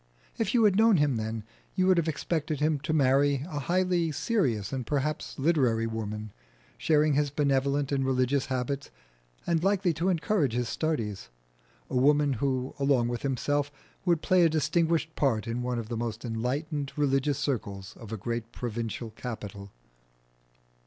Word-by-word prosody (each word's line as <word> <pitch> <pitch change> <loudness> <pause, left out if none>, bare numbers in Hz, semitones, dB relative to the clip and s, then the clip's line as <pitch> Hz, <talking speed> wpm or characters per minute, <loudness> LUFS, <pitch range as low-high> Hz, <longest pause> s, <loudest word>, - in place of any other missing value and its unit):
If - - 0
you 235 - +5
had 200 -3 +4
known 220 -2 +6
him 145 -5 +2
then 110 0 -3 0.3
you 185 -1 +2
would 185 -1 +4
have 165 - -1
expected 155 -1 -2
him 150 0 +1
to 155 - -3
marry 140 -1 +3
a 150 -5 -4
highly 175 +1 +1
serious 135 - 0
and 130 -1 -2
perhaps 150 +4 -2
literary 135 -7 +2
woman, 110 -2 -4 0.4
sharing 155 -2 +3
his 145 +1 +2
benevolent 140 0 +1
and 135 -1 +1
religious 130 +1 +1
habits, 130 +2 -2 0.6
and 165 -1 +1
likely 190 -3 +2
to 170 +5 0
encourage 165 - +1
his 120 0 0
studies 115 -12 -2 0.6
a - - -5
woman 145 +2 +4
who 130 -2 -1
along 135 -4 +2
with 120 -1 -3
himself 145 +2 0 0.3
would 170 -4 +1
play 185 -2 +4
a 165 - +5
distinguished 160 +1 +1
part 120 -7 +1
in 115 +1 -2
one 125 0 -2
of 115 -2 -4
the 115 0 -3
most 115 +1 -4
enlightened 135 +6 -2
religious 140 -1 +1
circles 100 -9 -3
of 115 -2 -10
a 110 - -3
great 115 +2 -4
provincial 115 -1 -4
capital. 105 -4 -7
140 Hz, 160 wpm, -28 LUFS, 120-155 Hz, 0.6 s, known